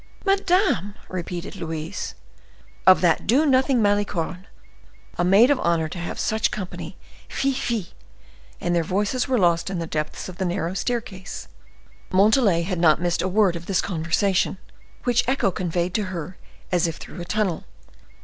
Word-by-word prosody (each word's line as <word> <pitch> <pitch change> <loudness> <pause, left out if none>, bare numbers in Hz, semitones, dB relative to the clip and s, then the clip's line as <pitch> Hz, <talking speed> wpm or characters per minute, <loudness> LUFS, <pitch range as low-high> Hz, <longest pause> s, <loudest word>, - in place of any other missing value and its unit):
"Madame!" 365 - +2
repeated 180 +1 -5
Louise. 165 -1 -5 0.7
"Of 185 - +8
that 170 -3 +2
do 265 +9 +4
nothing 260 -3 +3
Malicorne! 195 -2 0 0.7
A - - +3
maid 200 +9 +6
of 280 - +2
honor 165 -2 +1
to 175 - -6
have 170 - -5
such 220 -1 +1
company—fie! 215 +7 -5
fie!" 230 -7 -2 0.7
and 175 - -1
their 170 -1 +2
voices 205 - 0
were 260 -2 +2
lost 170 -3 +2
in 190 - -3
the 170 - -2
depths 155 -1 -4
of 185 -1 -9
the 190 - 0
narrow 175 -1 -1
staircase. 205 -3 -4 0.6
Montalais 200 -2 +4
had 180 0 -2
not 160 -3 +5
missed 175 -1 0
a - - 0
word 190 -2 +3
of 170 0 -7
this 195 -2 +1
conversation, 180 +3 0 0.5
which 245 -1 +2
echo 260 -7 +2
conveyed 175 0 -2
to 210 0 0
her 180 -1 -6 0.4
as 175 -2 +2
if 165 - -3
through - - -9
a - - -5
tunnel. 190 -3 -1
185 Hz, 160 wpm, -23 LUFS, 170-220 Hz, 0.7 s, Of